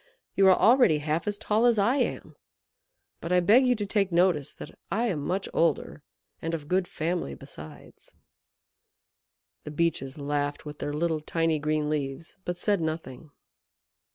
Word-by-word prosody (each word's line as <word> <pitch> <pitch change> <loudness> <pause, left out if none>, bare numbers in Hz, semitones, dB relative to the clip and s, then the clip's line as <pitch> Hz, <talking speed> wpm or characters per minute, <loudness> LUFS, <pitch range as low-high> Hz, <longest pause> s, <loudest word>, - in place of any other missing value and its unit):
"You 195 - +4
are 185 - +7
already 240 - +5
half 155 +5 -2
as 205 0 0
tall 220 +4 +2
as 235 -2 +3
I 225 +7 +3
am. - - -2 0.8
But 170 - -6
I 180 - +5
beg 225 +9 +5
you 250 - +3
to 210 -2 -3
take 195 -2 0
notice 170 -5 +2
that - - -10
I 225 +4 0
am 160 -7 -2
much 190 +5 -2
older, 160 -2 0 0.4
and 165 +1 -2
of 150 -3 -8
good 185 +1 +1
family 160 - -3
besides." 75 +4 -13 1.5
The - - -7
Beeches 150 -3 -1
laughed 145 +1 -2
with 150 0 -8
their 145 - -3
little, 160 0 0
tiny 165 0 0
green 150 0 0
leaves, 150 +1 -4
but 175 0 -3
said 200 0 0
nothing. 155 -2 -5
165 Hz, 160 wpm, -27 LUFS, 150-195 Hz, 1.5 s, are